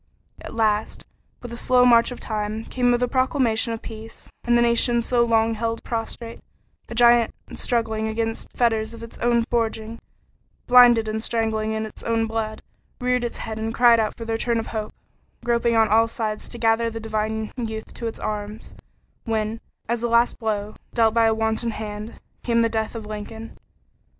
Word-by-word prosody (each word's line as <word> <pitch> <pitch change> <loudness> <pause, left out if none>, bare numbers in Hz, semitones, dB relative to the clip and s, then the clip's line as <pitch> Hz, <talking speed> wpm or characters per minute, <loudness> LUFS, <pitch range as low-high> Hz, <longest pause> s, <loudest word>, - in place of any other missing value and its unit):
At - - -9
last, 215 -1 0 0.4
with 240 - -7
the 235 - -6
slow 250 0 +4
march 235 -1 +6
of 250 - -7
time, 215 0 -3
came 250 -1 0
the 245 0 +2
proclamation 255 -3 +1
of 225 - -5
peace, 225 0 -9
and 240 0 +3
the - - +4
nation 235 0 +3
so 240 0 +2
long 225 -1 +2
held 230 +1 -3
prostrate 230 0 -5 0.5
a 235 - -6
giant 235 -1 +5 0.2
struggling 220 -2 -1
against 225 +1 -3
fetters 225 -2 +1
of 230 - -10
its 230 - -10
own 235 -1 +2
forging, 225 -1 -2 0.7
blinded 245 -2 +7
and 220 0 -2
strangling 220 -2 -1
in 220 0 -2
its 215 - -10
own 230 -1 0
blood 220 -1 -3 0.4
reared 250 0 +1
its 240 - -3
head 220 0 -5
and 225 +1 -3
cried 240 -1 +6
out 215 -1 -1
for 230 - -6
the 225 - -2
return 230 +1 0
of 225 - -2
Hope, 215 -2 -4 0.5
groping 235 -1 +2
on 225 -1 +5
all 225 +2 +4
sides 220 -3 -3
to 240 - -9
gather 230 0 +2
the 225 0 -6
divine 220 0 -2
youth 220 -3 -5
to 235 - -5
its 225 - -5
arms, 210 +1 -5 0.5
when, 220 -1 -2 0.3
as 235 0 -1
a 240 - 0
last 235 +1 +3
blow, 215 -2 -2 0.2
dealt 225 -2 +4
by 230 -1 +4
a 220 - +3
wanton 220 +1 0
hand, 215 0 -6 0.2
came 235 -1 +2
the 230 - +2
death 220 0 -2
of 225 -2 -6
Lincoln. 215 +2 -7
225 Hz, 185 wpm, -23 LUFS, 220-235 Hz, 0.7 s, blinded